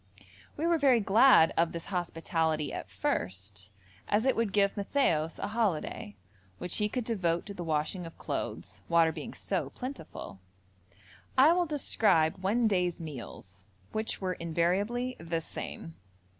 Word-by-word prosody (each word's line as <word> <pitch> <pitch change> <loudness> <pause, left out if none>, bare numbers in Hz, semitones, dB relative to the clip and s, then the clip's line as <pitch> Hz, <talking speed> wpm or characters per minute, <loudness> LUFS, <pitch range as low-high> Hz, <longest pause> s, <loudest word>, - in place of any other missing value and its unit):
We 315 - -1
were 335 -1 +3
very 265 -4 +5
glad 210 -3 +6
of 165 0 +2
this 170 -1 -5
hospitality 165 -3 -1
at - - -6
first 95 +2 -3 0.4
as 210 +3 +2
it 265 - +3
would 230 -3 0
give 200 -1 +3
Matthaios 195 - +1
a 200 - -3
holiday, 200 - -1 0.4
which 180 0 -3
he 210 0 +1
could 250 +2 -2
devote 180 -7 0
to 200 - -7
the 180 - -6
washing 160 +3 -1
of 165 - -13
clothes, - - -5
water 165 -1 +5
being - - -7
so - - -2
plentiful. 250 - -8 1.0
I 290 +6 +7
will 350 -1 +1
describe 205 - +2
one 225 +5 +3
day's 180 -4 +1
meals, 115 - -9 0.3
which 220 0 -2
were 185 -1 -1
invariably 190 +10 0
the 165 0 -2
same. 80 - -7
180 Hz, 145 wpm, -30 LUFS, 160-225 Hz, 1.0 s, I